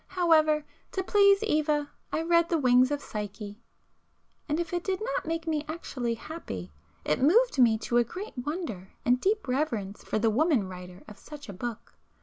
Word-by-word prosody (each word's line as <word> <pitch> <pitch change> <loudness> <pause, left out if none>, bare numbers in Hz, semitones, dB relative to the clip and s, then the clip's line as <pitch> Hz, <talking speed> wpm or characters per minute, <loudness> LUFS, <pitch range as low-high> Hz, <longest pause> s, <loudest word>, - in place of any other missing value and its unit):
However, 310 -3 +4 0.3
to 380 - -1
please 400 +1 +5
Eva, 300 -6 +1 0.2
I 320 - -1
read 335 0 +3
the 335 - +2
'Wings 255 -2 +4
of 290 -1 -2
Psyche,'—and 210 - -8
if 345 0 -3
it 350 -1 -1
did 380 -1 -1
not 445 -5 -3
make 330 0 -2
me 310 -2 -1
actually 260 -7 -3
happy, 220 - -7 0.3
it 150 - +1
moved 395 - +4
me 230 -3 +5
to 235 +2 -1
a 240 - +5
great 370 - -8
wonder 250 - -5
and 250 +1 +3
deep 415 -3 0
reverence 235 -7 -2
for - - -2
the 220 +1 +2
woman 265 - +2
writer 180 0 -10
of 210 - -12
such 295 -2 -11
a - - -5
book. 230 +4 -6
290 Hz, 175 wpm, -28 LUFS, 225-335 Hz, 0.3 s, please